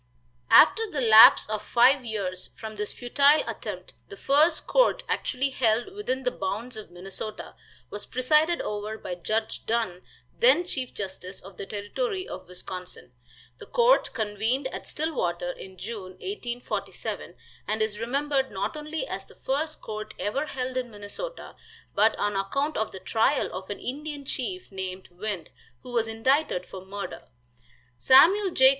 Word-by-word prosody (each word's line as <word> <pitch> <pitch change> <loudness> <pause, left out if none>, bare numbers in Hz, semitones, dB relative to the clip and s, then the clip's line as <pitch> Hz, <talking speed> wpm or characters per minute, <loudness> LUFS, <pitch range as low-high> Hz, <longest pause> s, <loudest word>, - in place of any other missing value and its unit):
After 450 -1 +7
the 300 - -3
lapse 220 -2 +9
of 215 0 -2
five 250 +5 +4
years 195 -5 -3
from 220 -1 -7
this 210 0 -3
futile 280 +5 +4
attempt - - -6 0.2
the 400 - -9
first 310 +3 +3
court - - +3
actually 270 +1 0
held 240 - +1
within 265 -11 -2
the 250 - +1
bounds 220 +3 -4
of 215 -1 -8
Minnesota 190 +4 -7 0.4
was 205 - -6
presided 305 +7 +2
over 210 +1 -4
by 185 - -5
Judge 215 +6 -2
Dunn, 220 -6 0 0.4
then 475 -7 +5
chief 260 -7 -3
justice 190 -1 -6
of 190 -1 -13
the 195 - -6
Territory 370 - -3
of - - -8
Wisconsin. 180 -5 -8 0.5
The - - -11
court - - +4
convened 220 +4 -1
at - - -7
Stillwater 175 - -1
in 190 +1 -11
June, 200 -2 -6
1847, 245 - -5 0.3
and 215 +1 -1
is 210 -1 -3
remembered 270 +3 0
not 200 +5 -3
only 305 +6 -4
as - - -5
the - - -18
first 310 +4 -2
court 215 0 -6
ever 275 +9 -1
held 255 -2 -3
in 250 -1 -2
Minnesota, 215 - -7 0.4
but 220 +2 +4
on 205 0 -1
account 275 +11 -1
of 220 - -1
the 190 - -8
trial 225 +8 +1
of 190 0 -6
an 205 - -3
Indian 290 +2 -5
chief, 365 - -4
named 190 -1 -6
"Wind," 185 -2 -4 0.3
who 250 - -9
was 230 -2 +1
indicted 225 - +1
for 190 -1 -9
murder. 200 +1 -6 0.8
Samuel 370 - +6
J. 265 -6 +6
230 Hz, 155 wpm, -27 LUFS, 205-285 Hz, 0.8 s, lapse